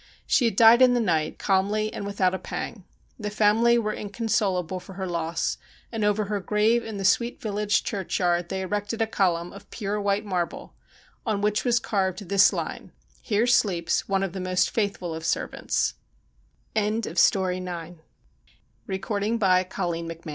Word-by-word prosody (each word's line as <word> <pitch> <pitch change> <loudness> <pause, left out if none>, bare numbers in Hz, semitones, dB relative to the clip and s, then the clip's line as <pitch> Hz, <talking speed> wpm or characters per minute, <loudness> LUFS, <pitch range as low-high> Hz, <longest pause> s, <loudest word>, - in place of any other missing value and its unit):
She 250 - +3
had 225 -4 +1
died 230 +3 +7
in 250 -1 +6
the - - +2
night, 165 -8 0
calmly 205 +2 +1
and 200 - -5
without 190 -2 +1
a 190 - -2
pang. 200 -6 -6 0.3
The 210 -1 -3
family 220 +3 +4
were 215 -2 -1
inconsolable 195 -4 -1
for 190 - -12
her 190 0 -4
loss, 170 -2 -2 0.3
and 225 -2 -2
over 210 0 +2
her 205 0 -2
grave 215 +4 +2
in 220 -2 -6
the 195 - -3
sweet 235 +5 +2
village 210 -1 0
churchyard 175 -3 -1
they 190 0 -2
erected 205 +3 -3
a 225 - +3
column 180 -5 0
of 200 0 -13
pure 210 -1 -3
white 200 +1 0
marble, 180 -4 -3 0.5
on 215 -4 -1
which 210 0 +1
was 240 -2 +3
carved 195 -3 -2
this 195 -1 +6
line: - - -5 0.3
Here 215 0 +1
sleeps 195 -10 +1
one 195 0 +1
of 190 -3 -3
the 190 - -5
most 185 0 +1
fait 205 -3 0
205 Hz, 140 wpm, -25 LUFS, 190-215 Hz, 0.5 s, died